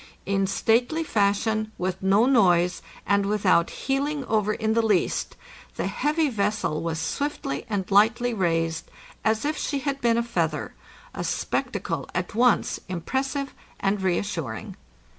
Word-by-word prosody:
In_ 195 Hz, -1 st, +1 dB
stately 245 Hz, +11 st, +2 dB
fashion, 215 Hz, 0 st, +1 dB
with 185 Hz, +1 st, -2 dB
no 195 Hz, +4 st, +4 dB
noise, 180 Hz, -9 st, +3 dB, 0.2 s
and 200 Hz, +1 st, +3 dB
without 195 Hz, -4 st, +3 dB
heeling 280 Hz, +1 st, -2 dB
over 215 Hz, -2 st, +1 dB
in 220 Hz, 0 st, 0 dB
the 230 Hz, -, +3 dB
least, 210 Hz, -5 st, 0 dB, 0.4 s
the -, -, -2 dB
heavy 305 Hz, +1 st, +1 dB
vessel 205 Hz, -, -1 dB
was 165 Hz, -1 st, -2 dB
swiftly 160 Hz, -, -3 dB
and 200 Hz, -3 st, -1 dB
lightly 225 Hz, +4 st, +4 dB
raised, 165 Hz, -5 st, 0 dB, 0.3 s
as 220 Hz, +3 st, +1 dB
if 305 Hz, +1 st, 0 dB
she 285 Hz, -, -1 dB
had 275 Hz, 0 st, -2 dB
been 235 Hz, -1 st, +3 dB
a 235 Hz, -, +2 dB
feather 165 Hz, -, -2 dB, 0.2 s
— -, -, -23 dB
a -, -, -4 dB
spectacle -, -, -2 dB
at 180 Hz, 0 st, -2 dB
once 240 Hz, +1 st, +2 dB
impres 185 Hz, +10 st, -1 dB
sive 275 Hz, 0 st, -4 dB, 0.3 s
and 195 Hz, 0 st, 0 dB
reassuring. 175 Hz, -, -2 dB
210 Hz, 145 wpm, -25 LUFS, 185-245 Hz, 0.4 s, no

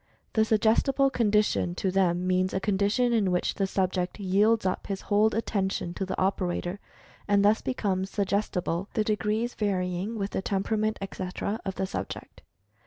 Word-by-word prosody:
The 220 Hz, -, +4 dB
"Suggestible 230 Hz, +5 st, +3 dB
Condition" 210 Hz, -6 st, +1 dB
to 190 Hz, +1 st, -1 dB
them 180 Hz, -2 st, +1 dB
means 185 Hz, 0 st, +1 dB
a -, -, +2 dB
condition 205 Hz, +5 st, +1 dB
in 210 Hz, -5 st, +2 dB
which 180 Hz, -, 0 dB
the 195 Hz, -, -1 dB
subject 185 Hz, 0 st, -1 dB
yields 205 Hz, +3 st, +2 dB
up 185 Hz, -, -1 dB
his 195 Hz, -1 st, -3 dB
whole 210 Hz, +1 st, +3 dB
"attention" 195 Hz, -5 st, -1 dB
to 190 Hz, +1 st, -4 dB
the 190 Hz, -, -3 dB
operator, 185 Hz, 0 st, -1 dB, 0.5 s
and 200 Hz, -1 st, +3 dB
thus 215 Hz, +2 st, +4 dB
becomes 195 Hz, -7 st, -1 dB
"suggestible," 195 Hz, -3 st, -1 dB
the 215 Hz, -, +2 dB
degrees 215 Hz, +3 st, 0 dB
varying 190 Hz, +1 st, -1 dB
with 200 Hz, -1 st, -3 dB
the -, -, -2 dB
temperament, 215 Hz, +3 st, 0 dB
etc., 195 Hz, +3 st, -4 dB
of 190 Hz, -, -3 dB
the 190 Hz, -, -1 dB
subject. -, -, -6 dB
200 Hz, 160 wpm, -27 LUFS, 185-215 Hz, 0.5 s, The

